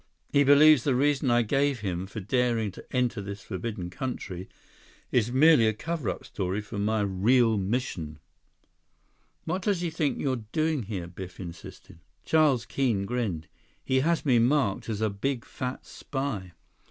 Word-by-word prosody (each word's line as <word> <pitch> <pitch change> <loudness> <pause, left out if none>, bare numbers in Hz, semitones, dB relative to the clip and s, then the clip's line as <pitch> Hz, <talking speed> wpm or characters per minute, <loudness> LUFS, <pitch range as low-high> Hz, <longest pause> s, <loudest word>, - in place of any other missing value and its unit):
He 145 - +5
believes 145 -1 +7
the 135 -3 +2
reason 140 0 +2
I 120 0 +4
gave 135 +1 +1
him 95 -2 -3
for 110 - -7
daring 115 0 0
to - - -11
enter 125 -4 0
this 100 +1 -7
forbidden 95 -2 -5
country 95 -8 -5 0.6
is 120 -1 +2
merely 135 -3 +6
a 110 - +2
cover 160 - -3
up - - -5
story 95 +1 -3
for 105 0 -6
my 110 +1 +1
real 110 +4 +3
mission." 95 -7 -2 1.3
"What 180 +4 -2
does 200 -3 0
he 170 -2 -2
think 150 -3 -1
you're 130 -5 -1
doing 155 -3 +1
here?" 100 -5 -5
Biff 90 +1 -9
insisted. 85 -2 -10 0.3
Charles 150 -7 +3
Keene 120 -5 0
grinned. 100 -9 -2 0.4
"He 130 0 +2
has 165 +4 +1
me 125 -4 +4
marked 120 -4 +1
as 110 -1 -3
a 110 -2 +1
big 120 +5 -2
fat 130 0 -5
spy." 135 - -5
120 Hz, 160 wpm, -27 LUFS, 100-140 Hz, 1.3 s, believes